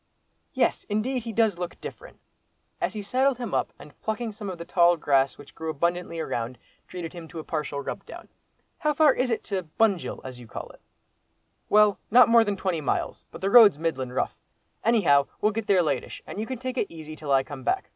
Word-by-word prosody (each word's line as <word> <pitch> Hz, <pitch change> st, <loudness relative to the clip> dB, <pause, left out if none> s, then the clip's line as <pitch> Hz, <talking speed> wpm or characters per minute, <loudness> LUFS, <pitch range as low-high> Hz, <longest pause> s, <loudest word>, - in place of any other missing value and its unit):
"Yes, -, -, +1 dB
indeed, 240 Hz, +5 st, 0 dB
he 230 Hz, -, -3 dB
does 220 Hz, -5 st, +2 dB
look 175 Hz, -1 st, -5 dB
different," -, -, -10 dB, 0.6 s
as -, -, 0 dB
he 210 Hz, -1 st, -5 dB
saddled 260 Hz, +5 st, +2 dB
him 240 Hz, -4 st, -5 dB
up, -, -, 0 dB
and, 150 Hz, -, -15 dB
plucking 220 Hz, +1 st, -2 dB
some 205 Hz, -1 st, -7 dB
of 185 Hz, -, -5 dB
the 170 Hz, -, -7 dB
tall 175 Hz, -1 st, +4 dB
grass 140 Hz, -3 st, +2 dB
which 145 Hz, -, -14 dB
grew 160 Hz, 0 st, -5 dB
abundantly 170 Hz, +2 st, -1 dB
around, 120 Hz, -5 st, -3 dB, 0.3 s
treated 170 Hz, -3 st, -6 dB
him 170 Hz, -2 st, -9 dB
to 165 Hz, -, -11 dB
a 160 Hz, -, -5 dB
partial 150 Hz, -3 st, -3 dB
rub -, -, -5 dB
down. -, -, -10 dB, 0.5 s
"How 300 Hz, -2 st, +1 dB
far 300 Hz, -3 st, +6 dB
is 255 Hz, 0 st, 0 dB
it 230 Hz, -, -1 dB
to 190 Hz, -5 st, -3 dB
Bunjil, 205 Hz, -6 st, +2 dB
as 130 Hz, -1 st, -8 dB
you 120 Hz, -, -12 dB
call -, -, -7 dB
it?" -, -, -20 dB, 0.9 s
"Well, 210 Hz, -1 st, +5 dB
not 245 Hz, +2 st, +7 dB
more 230 Hz, 0 st, +7 dB
than 205 Hz, -2 st, -2 dB
twenty 185 Hz, -4 st, -1 dB
miles, 145 Hz, -, -2 dB
but -, -, -11 dB
the 195 Hz, +1 st, 0 dB
road's 225 Hz, -9 st, +8 dB
middlin' 135 Hz, -6 st, -2 dB
rough. 125 Hz, -, -1 dB, 0.5 s
Anyhow 175 Hz, -12 st, +4 dB
we'll 210 Hz, -, +2 dB
get 220 Hz, 0 st, -4 dB
there 190 Hz, -3 st, +4 dB
latish, 140 Hz, -5 st, -3 dB
and -, -, -7 dB
you 220 Hz, -, -3 dB
can 260 Hz, -, -4 dB
take 255 Hz, +1 st, -4 dB
it -, -, 0 dB
easy 155 Hz, -2 st, -9 dB
till 150 Hz, -2 st, -5 dB
I 135 Hz, -1 st, +4 dB
come 135 Hz, -1 st, -9 dB
back. -, -, -1 dB
185 Hz, 215 wpm, -26 LUFS, 155-225 Hz, 0.9 s, road's